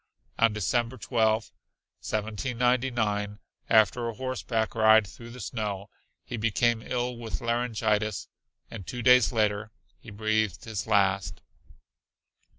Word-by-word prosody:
On 115 -1 +5
December 120 +4 -1
12, 110 -2 +1 0.5
1799, 110 -1 -1 0.3
after 115 +2 +4
a 115 - -6
horseback 120 -3 -2
ride 110 -1 +5
through 115 +5 -12
the 125 +2 -10
snow, 105 -3 -4 0.3
he 120 - -5
became 115 +1 +1
ill 125 0 -2
with 115 -2 -5
laryngitis 110 -3 -1 0.4
and 105 -5 -8
two 125 -1 -5
days 125 -2 +6
later 105 -2 0 0.3
he - - -12
breathed 110 0 -1
his 110 -3 -4
last. 100 -2 +1
110 Hz, 115 wpm, -27 LUFS, 105-120 Hz, 0.5 s, days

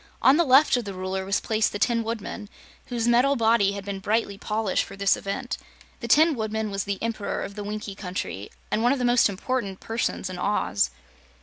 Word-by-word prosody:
On 265 - +7
the 340 - +4
left 275 0 +5
of 240 - -3
the 200 -2 -6
Ruler 190 +1 -3
was 195 0 +1
placed 220 -1 0
the - - -3
Tin 230 +2 +1
Woodman, 220 -2 -5 0.4
whose 240 -2 -1
metal 250 +4 +4
body 225 -4 +3
had 200 -1 -6
been 200 -1 -4
brightly 210 +1 0
polished 210 0 -1
for 195 - -10
this 195 0 +3
event. 245 +6 -4 0.4
The 235 - -5
Tin 315 +7 +5
Woodman 220 -2 -2
was 195 -1 -2
the 200 -1 -2
Emperor 225 -3 -2
of 200 - -6
the 205 0 -6
Winkie 210 0 -5
Country 180 - -5 0.2
and 220 - +1
one 245 +3 +4
of - - -1
the 250 - -1
most 240 -2 +4
important 200 -1 -3
persons 225 -3 -2
in 185 -1 -6
Oz. 185 - +1
215 Hz, 210 wpm, -25 LUFS, 195-235 Hz, 0.4 s, On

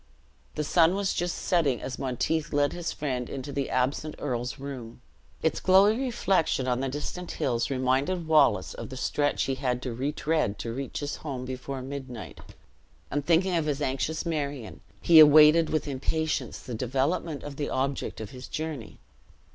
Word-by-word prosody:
The 150 - -1
sun 165 +3 +4
was 200 -1 0
just 175 0 -1
setting 155 -9 +1
as 130 - -6
Monteith 150 +5 -1
led 145 0 +2
his 175 -1 -3
friend 130 -4 -3
into 135 +1 -6
the 140 -1 -2
absent 140 +4 -1
earl's 125 -3 -3
room. 130 -5 -8 0.4
Its 160 - +1
glowing 200 +6 +5
reflection 190 - +1
on 125 -1 +1
the 135 0 -1
distant 150 +6 -5
hills 120 +1 -1
reminded 135 +7 0
Wallace 155 -3 +3
of - - -7
the 130 - -7
stretch 145 +2 0
he 135 - -1
had 125 -2 -1
to 125 - -3
retread 145 -2 -1
to 115 - -4
reach 135 +3 -5
his 145 0 -3
home 135 -4 -5
before 130 +1 -5
midnight; 130 -5 -7 0.7
and 145 0 -1
thinking 175 +4 +3
of 160 -2 0
his 145 -1 -1
anxious 145 +4 -2
Marion, 145 -7 -3 0.2
he 165 -2 +7
awaited 155 +2 +8
with 155 -1 -1
impatience 155 +3 -2
the 125 - -8
development 135 +6 -1
of 145 -1 -8
the 145 - -2
object 135 +1 -2
of 110 -2 -7
his 130 0 -9
journey. 155 -8 -5
140 Hz, 170 wpm, -27 LUFS, 130-160 Hz, 0.7 s, awaited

